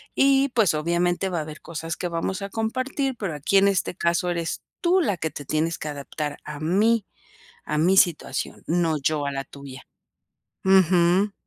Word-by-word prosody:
y 275 0 +4
pues, 220 -9 +3
obviamente, 175 +4 0
va 175 -2 -2
a - - -1
haber 155 0 -8
cosas 165 0 -5
que 180 - -2
vamos 175 +4 -2
a 200 - -4
compartir, 255 +5 -2
pero 190 -7 -3
aquí 150 +7 +1
en 200 +1 +5
este 180 - -1
caso 170 +1 0
eres 170 -1 -2 0.2
tú 365 +2 +3
la 205 - 0
que 160 -1 -3
te 145 - -8
tienes 160 +4 0
que 150 - -5
adaptar 145 +1 -5
a 150 -1 -7
mí, 205 +7 +2 0.6
a 150 - -2
mi 180 +5 +3
situación, 175 -4 +1
no 165 -2 +1
yo 150 +1 0
a 140 - -1
la 135 0 -4
tuya". 140 -2 -11 0.8
Ujú. 190 +1 +4
170 Hz, 185 wpm, -24 LUFS, 155-200 Hz, 0.8 s, en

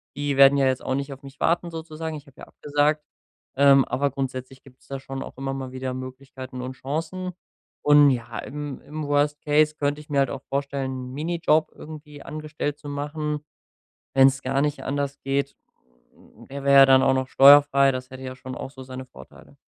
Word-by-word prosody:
die 145 -1 -1
werden 140 +1 +7
ja 135 - +3
jetzt 130 -1 0
auch 130 - -1
nicht 140 +1 -3
auf 135 - -13
mich 135 -1 -13
warten, 170 +1 +1
sozusagen. 160 -1 -6
Ich 145 - -10
hab 140 -3 -20
ja - - -10
abgesagt, 150 +1 0 0.5
ähm, 140 0 +6
aber 140 +1 0
grundsätzlich 130 -1 -6
gibt's 130 -2 -20
da 135 0 -5
schon 135 0 -7
auch - - -9
immer 135 0 -3
mal 130 -1 -6
wieder 130 0 -4
Möglichkeiten 130 0 -8
und 130 +1 -5
Chancen. 165 +7 -4 0.5
Und 145 -1 +7
ja, 115 -2 -4
im 145 0 -6
im 155 +1 -7
Worst 145 +1 +1
Case 150 +1 +3
könnt 145 0 -1
ich 150 - -13
mir 140 - +1
halt 135 -2 +2
auch 135 - -6
vorstellen, 140 -1 -2 0.2
'n - - -10
Minijob 155 +1 +1
irgendwie 150 -2 -11
angestellt 150 -1 -5
zu 145 - -11
machen, 150 +1 -4 0.7
wenn's 135 0 +5
gar 135 +1 -1
nicht 150 0 -1
anders 140 0 -2
geht. 140 +1 -1 0.9
Äh, 135 - -11
er 140 - -5
wär 140 - +3
ja 135 0 +9
dann 130 0 +6
auch 135 0 +4
noch 130 0 0
steuerfrei, 140 0 +7
das 130 0 -5
hätte 130 0 -10
ja 130 0 -7
schon 130 0 -8
auch 135 - -7
so 130 -1 -11
seine 130 0 -8
Vorteile. 130 - -16
140 Hz, 200 wpm, -24 LUFS, 130-150 Hz, 0.9 s, ja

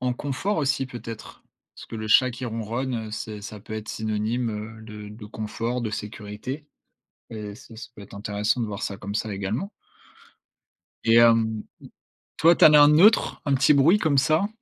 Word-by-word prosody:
en 125 0 0
confort 145 +11 -2
aussi 140 -3 0
peut-être? 115 -3 -9 0.3
Parce - - -11
que - - -10
le 110 0 -5
chat 130 +4 +5
qui 125 +2 -7
ronronne, 115 0 -3
c'est 105 -1 -6
ça 105 -1 -9
peut 110 - -11
être 110 0 -6
synonyme, 110 +2 -2
heu, 110 +1 -7
de 105 -1 -9
de 105 0 -10
confort, 115 +3 -4
de 110 -2 -3
sécurité 105 +7 -6 0.6
et 105 -2 -7
ça 115 0 -14
ce 110 - -10
peut 105 - -11
être 100 - -12
intéressant 105 +3 -1
de 115 - 0
voir 105 0 -6
ça, 100 - -4
comme 100 +2 -6
ça 110 0 -2
également 105 - -3 1.3
et 115 0 +4
hem, 115 -2 +4 0.7
toi, 165 +1 +5
tu - - +5
en 150 - +8
as 150 - +9
un 145 - +8
neutre, 185 +9 +4
un 140 -2 +1
petit 140 +3 +4
bruit, 160 +9 +5
comme 150 -7 +1
ça? 155 +8 +2
115 Hz, 190 wpm, -24 LUFS, 105-135 Hz, 1.3 s, as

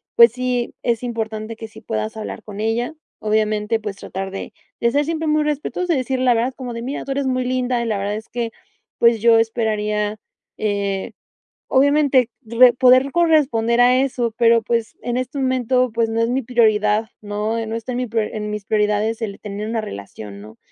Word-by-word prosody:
pues 235 -1 +8
sí, 250 0 -2
es 235 -2 0
importante 225 -2 -4
que 225 0 -8
sí 220 - -14
puedas 220 0 -3
hablar 220 - -6
con 205 -1 -9
ella. 230 +5 -1 0.2
Obviamente, 215 +1 0
pues 210 -2 -5
tratar 195 -1 -6
de, 195 - -7 0.3
de 235 - +2
ser 290 +3 +2
siempre 320 0 -2
muy 305 0 +3
respetuoso 300 +4 -1
y 285 - +1
decir, 260 0 -1
la 250 -2 +3
verdad, 245 +3 0
como 250 -3 -6
de: 230 0 -5
"Mira, 270 +3 -4
tú 275 - -4
eres 280 0 -1
muy 255 -1 0
linda, 250 -1 0
y 235 - -2
la 215 -2 0
verdad 200 +1 -2
es 220 +1 -8
que, 235 -1 -3 0.5
pues 235 -1 +5
yo 230 +1 +5
esperaría, 210 -2 0 0.4
eh, 200 -2 -2 0.5
obviamente, 280 -2 +3
re 240 +1 +5
poder 255 +2 +5
corresponder 275 -9 +3
a 250 +1 +5
eso, 250 -3 -1
pero, 230 -1 +5
pues, 230 0 -2
en 240 0 -2
este 255 +2 -3
momento, 255 -1 +1
pues 230 0 +1
no 225 0 0
es 230 - +1
mi 260 +2 0
prioridad, 220 -2 +2
¿no? 215 +2 -2
No 220 +1 -4
está 230 +2 -4
en 245 - -2
mi 255 - -1
priori 220 -1 -1
en 210 -1 -4
mis 210 -1 -5
prioridades 210 +2 +1
el 200 -2 -5
tener 210 +1 -5
una 225 0 -1
relación, 100 - -8
¿no?". 110 +2 -13
230 Hz, 200 wpm, -20 LUFS, 215-255 Hz, 0.5 s, pues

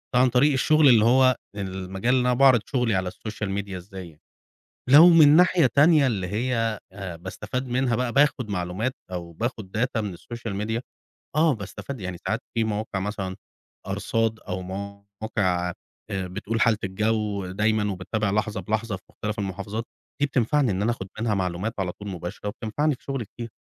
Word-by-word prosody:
عن 125 +1 +5
طريق 130 +5 +4
الشغل، 155 +3 +4
اللي 115 -3 +6
هو 130 +1 +5 0.2
المجال 95 +3 -2
اللي 130 - +3
أنا 125 0 +2
باعرض 130 -1 +6
شغلي 125 -6 0
على 95 -1 -1
الSocial 110 0 -6
Media. 100 -1 -6
إزاي 90 -4 -9 0.7
لو 155 +6 +9
من 155 -3 +7
ناحية 180 -2 +5
تانية، 150 -1 +6
اللي 100 -7 -1
هي 115 +1 -1
آآ، 95 -3 -7
باستفاد 105 +9 -5
منها 125 -1 +1
بقى، 125 0 -1
باخد 140 -5 +2
معلومات 95 +6 -2 0.2
أو 85 -2 -5
باخد 110 0 -4
data 120 -1 0
من 100 -4 -4
الSocial 115 -1 -7
Media. 110 +2 -2 0.6
آه، 155 -1 +4
باستفاد. 110 +5 -7
يعني 90 -2 -5
ساعات 110 +2 0
في 115 - +1
مواقع 105 -2 -2
مثلًا 95 -2 -4 0.5
أرصاد، 115 -1 -1
أو 95 -2 -5
مواقع 100 -1 -3 0.4
آآ، 95 -1 -2
بتقول 105 +4 -3
حالة 115 -3 +4
الجو 105 0 -1
دايمًا، 105 +2 +1
وباتابع 100 +3 -2
لحظة 105 -1 -1
بلحظة 110 +2 -2
في 95 - -16
مختلف 105 +1 -5
المحافظات. 100 +3 -4 0.4
دي 145 - +4
بتنفعني 135 0 +1
إن 95 0 -1
أنا 110 - +2
أخد 95 -5 -7
منها 115 -2 +1
معلومات 95 +3 -2
على 90 -2 -1
طول 105 +2 -9
مباشرة، 90 +2 -5
وبتنفعني 120 +8 -1
في - - -18
شغلي 135 -4 -3
كتير. 115 +3 -9
110 Hz, 170 wpm, -25 LUFS, 95-125 Hz, 0.7 s, لو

